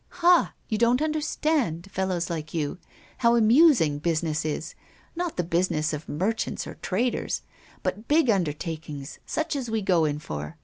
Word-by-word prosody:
"Ha! 355 Hz, -1 st, +5 dB
you 215 Hz, -, -1 dB
don't 235 Hz, +2 st, +4 dB
understand, 305 Hz, -, 0 dB
fellows 185 Hz, -2 st, -1 dB
like 160 Hz, -2 st, -5 dB
you, 155 Hz, +2 st, -2 dB, 0.4 s
how 235 Hz, -1 st, +4 dB
amusing 230 Hz, -, +5 dB
business 160 Hz, -1 st, 0 dB
is, 155 Hz, +2 st, -3 dB, 0.4 s
not 345 Hz, -1 st, -3 dB
the 180 Hz, -, +1 dB
business 165 Hz, -2 st, 0 dB
of 150 Hz, +1 st, -6 dB
merchants 195 Hz, +9 st, -1 dB
or -, -, -7 dB
traders, 235 Hz, +7 st, -1 dB, 0.4 s
but 215 Hz, +2 st, -3 dB
big 305 Hz, -1 st, +4 dB
undertakings 160 Hz, -, -2 dB
such 315 Hz, 0 st, -1 dB
as 260 Hz, -4 st, -3 dB
we 220 Hz, -1 st, -1 dB
go 175 Hz, -4 st, +3 dB
in 145 Hz, -1 st, 0 dB
for! 75 Hz, -, -6 dB
185 Hz, 150 wpm, -26 LUFS, 155-240 Hz, 0.4 s, Ha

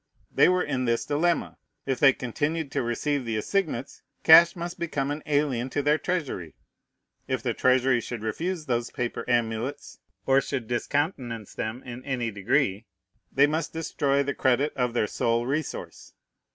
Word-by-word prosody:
They -, -, +5 dB
were 180 Hz, 0 st, +2 dB
in 130 Hz, -3 st, -1 dB
this 115 Hz, -1 st, 0 dB
dilemma: 165 Hz, +4 st, 0 dB, 0.3 s
If 135 Hz, -2 st, -1 dB
they 135 Hz, -, +7 dB
continued 145 Hz, +5 st, -3 dB
to -, -, 0 dB
receive 130 Hz, +4 st, -1 dB
the 115 Hz, -2 st, -2 dB
assignats, 150 Hz, -, -2 dB, 0.2 s
cash 165 Hz, +1 st, +8 dB
must 175 Hz, 0 st, -6 dB
become 145 Hz, -4 st, -2 dB
an 150 Hz, +1 st, -4 dB
alien 140 Hz, -4 st, 0 dB
to 145 Hz, -, -1 dB
their 150 Hz, +2 st, +3 dB
Treasury; 140 Hz, -, -3 dB, 0.7 s
if -, -, -2 dB
the -, -, 0 dB
Treasury 130 Hz, -1 st, +3 dB
should 115 Hz, -1 st, -6 dB
refuse 165 Hz, +9 st, -3 dB
those 120 Hz, -3 st, -1 dB
paper 120 Hz, -3 st, -3 dB
amulets, 120 Hz, +3 st, -1 dB, 0.3 s
or 135 Hz, 0 st, +4 dB
should 130 Hz, -5 st, -4 dB
discountenance 120 Hz, -, -2 dB
them 110 Hz, +4 st, -4 dB
in 125 Hz, 0 st, -8 dB
any 125 Hz, -4 st, -2 dB
degree, 100 Hz, +1 st, 0 dB, 0.4 s
they 140 Hz, -, +5 dB
must 155 Hz, +2 st, -2 dB
destroy 140 Hz, -3 st, 0 dB
the 140 Hz, 0 st, -2 dB
credit 135 Hz, +3 st, +1 dB
of 125 Hz, -2 st, -1 dB
their 115 Hz, -, +2 dB
sole 115 Hz, +2 st, 0 dB
resource. 145 Hz, +3 st, -4 dB
135 Hz, 160 wpm, -26 LUFS, 120-150 Hz, 0.7 s, cash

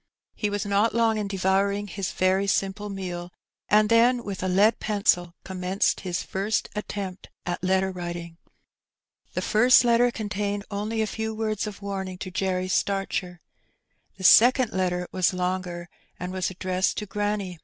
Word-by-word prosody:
He 210 Hz, -, -2 dB
was 205 Hz, 0 st, -2 dB
not 205 Hz, +3 st, +2 dB
long 225 Hz, -2 st, +2 dB
in 205 Hz, -, -2 dB
devouring 195 Hz, +1 st, +1 dB
his 195 Hz, -2 st, -4 dB
very 190 Hz, +2 st, +1 dB
simple 195 Hz, +1 st, -1 dB
meal, 180 Hz, -3 st, -5 dB, 0.4 s
and 210 Hz, 0 st, +5 dB
then 235 Hz, +2 st, +4 dB
with 200 Hz, -3 st, -5 dB
a 185 Hz, -, -1 dB
lead 200 Hz, +5 st, +3 dB
pencil 180 Hz, -5 st, +1 dB
commenced 185 Hz, +1 st, 0 dB
his 180 Hz, -2 st, -3 dB
first 200 Hz, +3 st, -1 dB
attempt 200 Hz, -3 st, -5 dB, 0.2 s
at 175 Hz, 0 st, -3 dB
letter 190 Hz, +1 st, +2 dB
writing. 175 Hz, -2 st, -6 dB, 1.0 s
The -, -, -2 dB
first 245 Hz, +4 st, +5 dB
letter 240 Hz, 0 st, +4 dB
contained 205 Hz, -2 st, -3 dB
only 215 Hz, +2 st, -1 dB
a -, -, 0 dB
few 220 Hz, +1 st, -4 dB
words 215 Hz, -1 st, -2 dB
of 205 Hz, -1 st, -8 dB
warning 190 Hz, -2 st, -4 dB
to 185 Hz, 0 st, -6 dB
Jerry 185 Hz, 0 st, -1 dB
Starcher. 185 Hz, -2 st, -1 dB, 0.8 s
The 190 Hz, -, -9 dB
second 245 Hz, +4 st, +6 dB
letter 180 Hz, -1 st, -1 dB
was 185 Hz, 0 st, +1 dB
longer, 180 Hz, -1 st, -3 dB, 0.3 s
and 180 Hz, +1 st, -4 dB
was 185 Hz, -1 st, -1 dB
addressed 185 Hz, 0 st, -1 dB
to 210 Hz, -, -3 dB
granny. 205 Hz, -3 st, -3 dB
195 Hz, 155 wpm, -25 LUFS, 185-210 Hz, 1.0 s, second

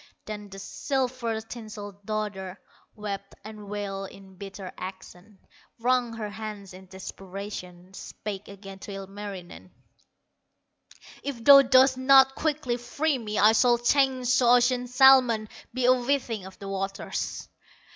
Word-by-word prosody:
Then 210 Hz, -1 st, -7 dB
the 195 Hz, -, -10 dB
silver 250 Hz, +1 st, -2 dB
tinselled 210 Hz, -3 st, -9 dB
daughter 205 Hz, -3 st, -4 dB, 0.4 s
Wept 200 Hz, -2 st, -6 dB
and 210 Hz, -1 st, -10 dB
wailed 195 Hz, -1 st, -4 dB
in 195 Hz, -1 st, -15 dB
bitter 195 Hz, 0 st, -8 dB
accents, 185 Hz, +1 st, -10 dB, 0.3 s
Wrung 245 Hz, 0 st, +1 dB
her 215 Hz, -2 st, -5 dB
hands 210 Hz, -3 st, -7 dB
in 190 Hz, +1 st, -13 dB
desperation, 190 Hz, -1 st, -8 dB
Spake 205 Hz, +1 st, -7 dB
again 195 Hz, -1 st, -11 dB
to 200 Hz, -, -9 dB
Ilmarinen: 195 Hz, -2 st, -8 dB, 1.5 s
"If 260 Hz, -5 st, -5 dB
thou 275 Hz, +2 st, +10 dB
dost 260 Hz, 0 st, +5 dB
not 270 Hz, 0 st, +6 dB
quickly 295 Hz, -5 st, -1 dB
free 275 Hz, +4 st, -1 dB
me, 215 Hz, -2 st, -4 dB
I 215 Hz, +2 st, +6 dB
shall 240 Hz, +2 st, +4 dB
change 255 Hz, 0 st, +2 dB
to 245 Hz, -, +3 dB
ocean 245 Hz, +1 st, +4 dB
salmon, 250 Hz, -3 st, +5 dB, 0.2 s
Be 255 Hz, 0 st, -1 dB
a 255 Hz, -, +7 dB
whiting 245 Hz, -6 st, -1 dB
of 190 Hz, -, -13 dB
the 200 Hz, -, -9 dB
waters." 195 Hz, 0 st, -4 dB
215 Hz, 130 wpm, -27 LUFS, 195-250 Hz, 1.5 s, thou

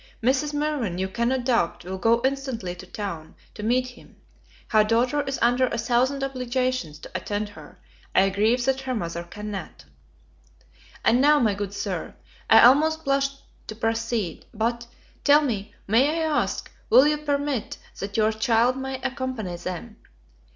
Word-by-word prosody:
Mrs. 265 Hz, +4 st, +2 dB
Mirvan, 290 Hz, -, -1 dB
you 190 Hz, +1 st, -1 dB
cannot 240 Hz, +5 st, -1 dB
doubt, 230 Hz, -9 st, 0 dB
will 190 Hz, +1 st, -5 dB
go 230 Hz, +3 st, +3 dB
instantly 265 Hz, -9 st, -2 dB
to 180 Hz, +1 st, -11 dB
town 180 Hz, -6 st, -6 dB, 0.2 s
to -, -, -8 dB
meet 250 Hz, +4 st, +1 dB
him; 250 Hz, -, -17 dB, 0.5 s
her 215 Hz, -2 st, +5 dB
daughter 240 Hz, +6 st, +2 dB
is 275 Hz, -1 st, -3 dB
under 245 Hz, +2 st, +3 dB
a -, -, -3 dB
thousand 250 Hz, +4 st, +1 dB
obligations 255 Hz, -, -2 dB
to -, -, -12 dB
attend 205 Hz, 0 st, -3 dB
her; 205 Hz, -, -14 dB, 0.4 s
I 195 Hz, +1 st, +4 dB
grieve 220 Hz, +5 st, +2 dB
that 265 Hz, 0 st, +1 dB
her 260 Hz, -1 st, -3 dB
mother 170 Hz, -5 st, -3 dB
cannot. 205 Hz, +3 st, -7 dB, 1.2 s
And 245 Hz, +2 st, +4 dB
now, 295 Hz, +2 st, +6 dB
my 220 Hz, -5 st, +2 dB
good 200 Hz, -1 st, -4 dB
Sir, -, -, -4 dB, 0.3 s
I -, -, +8 dB
almost 310 Hz, +6 st, +5 dB
blush 275 Hz, 0 st, +2 dB, 0.4 s
to 215 Hz, -, -6 dB
proceed; 225 Hz, -3 st, -2 dB
but, 235 Hz, +2 st, -1 dB, 0.4 s
tell 295 Hz, +1 st, +6 dB
me, 215 Hz, -6 st, -3 dB
may 235 Hz, +8 st, +4 dB
I -, -, 0 dB
ask 310 Hz, -2 st, -1 dB, 0.2 s
will 265 Hz, -, +7 dB
you 300 Hz, 0 st, +2 dB
permit 285 Hz, -4 st, -2 dB, 0.2 s
that 200 Hz, +1 st, -4 dB
your 215 Hz, 0 st, +3 dB
child 230 Hz, +2 st, +2 dB
may 265 Hz, 0 st, -4 dB
accompany 260 Hz, -8 st, -3 dB
them? 185 Hz, +6 st, -6 dB
235 Hz, 160 wpm, -25 LUFS, 210-265 Hz, 1.2 s, I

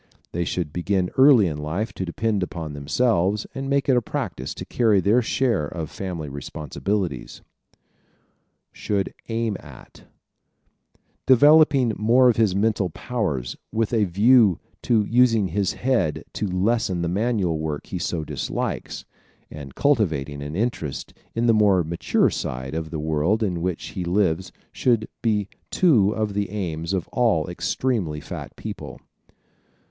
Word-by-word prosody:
They 85 Hz, 0 st, -2 dB
should 80 Hz, -5 st, -3 dB
begin 90 Hz, +1 st, 0 dB
early 130 Hz, -5 st, +7 dB
in 75 Hz, -4 st, -3 dB
life 90 Hz, +8 st, -3 dB
to 95 Hz, -, -4 dB
depend 105 Hz, +3 st, -1 dB
upon 80 Hz, -4 st, -4 dB
themselves 100 Hz, -, +1 dB
and 135 Hz, 0 st, -4 dB
make 140 Hz, 0 st, +1 dB
it 130 Hz, -, +4 dB
a 125 Hz, -, +3 dB
practice 65 Hz, -, -4 dB
to -, -, -7 dB
carry 110 Hz, -5 st, +2 dB
their 105 Hz, +6 st, +3 dB
share 115 Hz, -, 0 dB
of 80 Hz, 0 st, -6 dB
family 90 Hz, -7 st, -5 dB
responsibilities. 75 Hz, +3 st, -4 dB, 1.3 s
Should 100 Hz, -2 st, -2 dB, 0.2 s
Aim 115 Hz, -2 st, -1 dB
At -, -, -14 dB
¶ -, -, -17 dB, 1.2 s
Developing 140 Hz, -2 st, +6 dB
more 125 Hz, +4 st, +5 dB
of 110 Hz, -, -6 dB
his 110 Hz, -5 st, +2 dB
mental 100 Hz, -2 st, +1 dB
powers 80 Hz, -, -3 dB, 0.2 s
with 115 Hz, +1 st, -1 dB
a 110 Hz, -3 st, +3 dB
view 105 Hz, +1 st, +5 dB, 0.2 s
to 110 Hz, -3 st, +2 dB
using 115 Hz, -4 st, +3 dB
his 100 Hz, +3 st, 0 dB
head 85 Hz, -, 0 dB
to 105 Hz, -, -2 dB
lessen 95 Hz, -1 st, 0 dB
the -, -, 0 dB
manual 95 Hz, -3 st, 0 dB
work 75 Hz, -2 st, -4 dB
he 90 Hz, -, -5 dB
so 85 Hz, -2 st, -2 dB
dislikes, -, -, -4 dB, 0.5 s
and 70 Hz, -3 st, -9 dB
cultivating 80 Hz, -, +1 dB
an 75 Hz, +2 st, -6 dB
interest 95 Hz, -, -3 dB, 0.2 s
in 115 Hz, +1 st, +1 dB
the 115 Hz, -, +5 dB
more 100 Hz, -4 st, +4 dB
mature 85 Hz, +2 st, +1 dB
side 65 Hz, +3 st, -4 dB
of 80 Hz, 0 st, -3 dB
the 80 Hz, -, -4 dB
world 80 Hz, +8 st, +1 dB
in 90 Hz, -5 st, -1 dB
which 90 Hz, -1 st, -3 dB
he 90 Hz, -, -5 dB
lives 90 Hz, -1 st, 0 dB, 0.2 s
should 115 Hz, -4 st, +1 dB
be 105 Hz, -4 st, +1 dB, 0.2 s
two 125 Hz, -, +4 dB
of 110 Hz, -2 st, -1 dB
the 100 Hz, -1 st, -1 dB
aims 85 Hz, -5 st, -3 dB
of 95 Hz, -3 st, -1 dB
all 115 Hz, -, +1 dB
extremely 90 Hz, -3 st, -1 dB
fat -, -, -8 dB
people. -, -, -7 dB
100 Hz, 150 wpm, -23 LUFS, 80-115 Hz, 1.3 s, early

